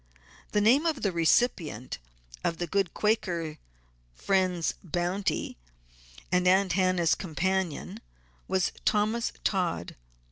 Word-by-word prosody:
The 210 - +2
name 265 +10 +4
of 310 -5 -1
the 200 - +2
recipient 165 - +1 0.4
of 165 - 0
the 175 - -2
good 190 +1 0
Quaker 175 -7 -1 0.6
friend's 185 - +1
bounty 175 - -2 0.7
and 180 0 +3
Aunt 190 -1 +4
Hannah's 185 -2 +3
companion, 185 0 -2 0.5
was 190 -2 +1
Thomas 215 +3 +1
Todd. 180 - -1
185 Hz, 105 wpm, -28 LUFS, 170-200 Hz, 0.7 s, name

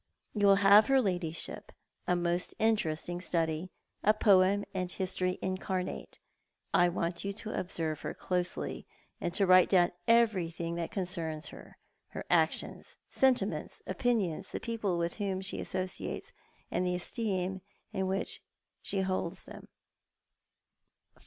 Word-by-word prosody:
You 205 -2 +3
will 195 - +8
have 205 +2 +8
her 270 0 +5
ladyship 175 -7 -2 0.2
— - - -45
a 180 - +3
most 175 0 -1
interesting 175 -6 0
study, 165 0 -1 0.3
a 215 +1 +5
poem 200 -1 +4
and 185 -2 -2
a - - -7
history 185 -1 -1
incarnate. 185 -1 -3 0.6
I 175 0 +5
want 170 0 -2
you 200 - -2
to 215 +1 -6
observe 160 -4 -3
her - - -4
closely, 180 -1 -3 0.3
and 175 - -2
to 200 - +4
write 185 -1 +6
dowm 180 -2 +4 0.2
everything 180 -8 +2
that 170 -1 -3
concerns 170 -5 -3
her— - - -13 0.3
her - - -7
actions, - - 0
sentiments, 210 - +1
opinions, 190 -4 0
the - - -4
people 220 -6 -2
with 170 0 -2
whom 195 -3 -1
she 190 +1 -4
associates, 185 -1 -4 0.4
and 180 - 0
the 180 0 0
esteem 190 -1 -1 0.3
in 190 0 -1
which 190 +1 0 0.4
she 195 - 0
holds 185 -1 -2
them." - - -11
185 Hz, 140 wpm, -31 LUFS, 175-200 Hz, 0.6 s, will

